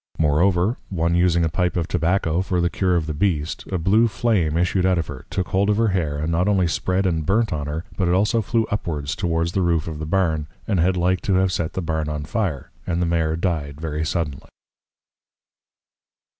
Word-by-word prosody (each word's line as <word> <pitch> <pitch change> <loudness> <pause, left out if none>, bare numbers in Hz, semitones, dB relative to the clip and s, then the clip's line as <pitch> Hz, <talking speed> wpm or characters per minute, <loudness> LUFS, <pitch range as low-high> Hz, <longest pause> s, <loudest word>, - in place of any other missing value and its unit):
Moreover, 85 - +2
one 85 -2 0
using 85 -1 +3
a - - +2
Pipe 90 +2 0
of 85 -2 -1
Tobacco 85 -1 +1
for 95 -1 -1
the 85 +1 +1
Cure 90 -2 +1
of 85 -3 0
the 80 - -3
Beast, 80 -2 -1
a 95 - 0
blue 100 +7 +3
Flame 100 -7 +1
issued 90 +2 +1
out 95 -1 +3
of 85 - 0
her, 70 -2 -9
took 95 -2 -2
hold 100 +2 +1
of 105 - +2
her 115 -1 +3
Hair, 80 -7 -1
and 80 +3 -2
not 90 +3 +1
only 95 -3 +3
spread 95 +3 0
and 80 -4 0
burnt 110 +7 +1
on 75 -2 -3
her, 80 +3 -4
but 95 - +1
it 85 - +2
also 105 +4 +2
flew 115 +2 0
upwards 80 -8 -2
towards 85 -1 0
the 95 - 0
Roof 85 -3 +1
of 80 -2 -5
the 80 - -4
Barn, 80 -4 0 0.2
and 100 -5 +1
had 90 +2 +2
like 90 +1 +1
to 95 - +1
have 95 0 +2
set 85 -3 -2
the 95 - -3
Barn 80 -2 -2
on 75 -1 -3
Fire: 85 - -2 0.2
And 85 -1 0
the 90 - +1
Mare 80 -2 +1
dyed 80 -5 -2
very 80 -1 -3
suddenly. 80 -4 -3
85 Hz, 220 wpm, -22 LUFS, 80-95 Hz, 0.2 s, using